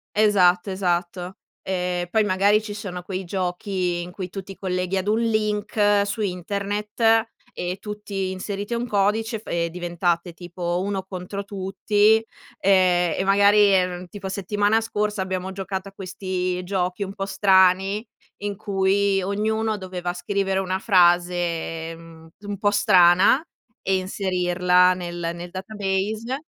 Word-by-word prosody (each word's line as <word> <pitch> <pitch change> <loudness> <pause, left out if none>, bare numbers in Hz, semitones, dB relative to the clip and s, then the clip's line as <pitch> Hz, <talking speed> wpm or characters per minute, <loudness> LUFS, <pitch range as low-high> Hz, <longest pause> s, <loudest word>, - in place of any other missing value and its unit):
Esatto, 195 -3 +4
esatto. 180 0 -2 0.2
Ehm, 180 -1 -2
poi 220 -1 +3
magari 205 +2 +3
ci 210 -1 -6
sono 195 -4 -6
quei 185 +1 -5
giochi 180 0 -2
in 175 +1 -7
cui 185 -1 -6
tu 195 +2 -6
ti 195 +1 -10
i - - -18
colleghi 185 0 -2
ad 190 - -2
un 215 +2 +2
link 210 -2 +1
su 205 +2 -4
internet 210 +4 0 0.3
e 180 +1 -4
tutti 205 -2 -4
inserite 200 +4 -4
un 240 +1 -2
codice 220 +2 0
fa - - -10
e 170 0 0
diventate 175 0 -2
tipo, 175 +1 -3
1 195 0 -2
contro 190 +1 -6
tutti, 205 +2 +2 0.4
ehm, 180 -3 +3
e - - +1
magari, 200 +1 +5
ehm, 180 -1 0
tipo 195 +1 -7
settimana 205 +3 +1
scorsa 210 -2 -2
abbiamo 190 0 -3
giocato 190 0 -4
a - - -10
questi 185 -1 -3
giochi 180 +1 -2
un 195 0 -6
po' 195 -1 -4
strani, 195 +1 +3 0.4
in 205 -1 -3
cui 195 -1 +1
ognuno 215 +3 -1
doveva 180 -2 -4
scrivere 195 +1 -1
una 185 0 -1
frase, 175 -4 +2
mhmm, 165 -1 -14 0.2
un 205 - -4
po' 205 +1 +2
strana 190 - +5 0.4
e 190 - +1
inserirla 180 -1 +2
nel 175 -2 -4
nel 175 0 -8
database. 210 +6 -3
190 Hz, 140 wpm, -23 LUFS, 180-205 Hz, 0.4 s, magari